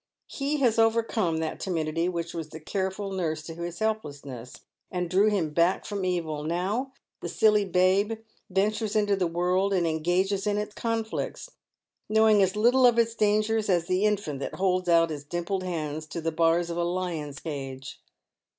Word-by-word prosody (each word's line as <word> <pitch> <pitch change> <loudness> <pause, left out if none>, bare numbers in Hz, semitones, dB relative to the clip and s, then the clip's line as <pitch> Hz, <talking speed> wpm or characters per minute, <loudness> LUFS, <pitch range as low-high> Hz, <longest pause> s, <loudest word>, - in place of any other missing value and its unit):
He 285 +2 -2
has 230 -3 +3
overcome 225 -6 +2
that 160 - -3
timidity 165 -1 -1
which 170 -2 -4
was 165 -2 -5
the 160 - -9
careful 190 +4 -3
nurse 160 -5 -2
to 165 - -7
his 170 +1 -6
helplessness, 145 - -4 0.3
and 180 -1 -2
drew 195 +5 +3
him 180 -7 0
back 170 +4 +2
from 200 -2 -3
evil. 165 -5 -2
Now 190 - -1 0.3
the 170 - -5
silly 210 +3 +3
babe 190 +4 +2 0.4
ventures 210 +3 0
into 205 -1 +3
the 185 -2 0
world 180 +4 +1
and 175 -2 +2
engages 180 +5 0
in 205 0 +1
its 210 0 -3
conflicts, 225 -1 -3 0.6
knowing 220 -1 +5
as 190 0 +2
little 245 +4 +5
of 240 -1 +3
its 230 -1 +3
dangers 215 0 +1
as 175 -3 +2
the 185 +3 +1
infant 205 -10 -1
that - - -5
holds 185 -1 0
out 165 -1 +4
its 145 -2 -5
dimpled 175 +5 -3
hands 155 -4 -4
to 160 - -5
the 165 0 -1
bars 165 +1 +2
of 170 - -4
a 175 - +1
lion's 170 -5 -3
cage. 135 -4 -7
185 Hz, 175 wpm, -27 LUFS, 165-210 Hz, 0.6 s, knowing